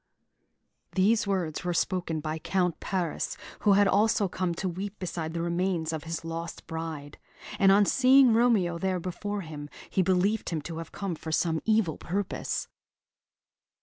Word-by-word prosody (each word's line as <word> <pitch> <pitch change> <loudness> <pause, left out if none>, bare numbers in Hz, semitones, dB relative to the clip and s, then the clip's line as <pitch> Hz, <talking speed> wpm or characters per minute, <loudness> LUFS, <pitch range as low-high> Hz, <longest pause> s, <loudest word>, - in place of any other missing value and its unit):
These 205 +3 +3
words 180 -6 -1
were 175 -1 -1
spoken 170 -3 -1
by 155 +1 -3
Count 180 +1 0
Paris, 180 -5 -2 0.2
who 205 - +4
had 200 0 +5
also 210 0 +3
come 180 -1 -2
to 190 - -2
weep 195 +4 -5
beside 170 -3 -4
the 165 - -1
remains 170 -2 0
of 155 -1 -4
his 165 0 -4
lost 165 0 -5
bride; 160 -3 -6 0.4
and 195 0 +6
on 200 +1 +6
seeing 260 +1 +6
Romeo 215 -8 +3
there 190 0 0
before 200 +4 -4
him, 150 -3 -8 0.2
he 190 - +2
believed 190 +4 +1
him 165 - -1
to 165 +1 -6
have 165 - -8
come 195 -3 -3
for 160 0 -6
some 160 0 +1
evil 215 -7 +2
purpose. 195 +3 -2
180 Hz, 160 wpm, -28 LUFS, 165-200 Hz, 0.4 s, and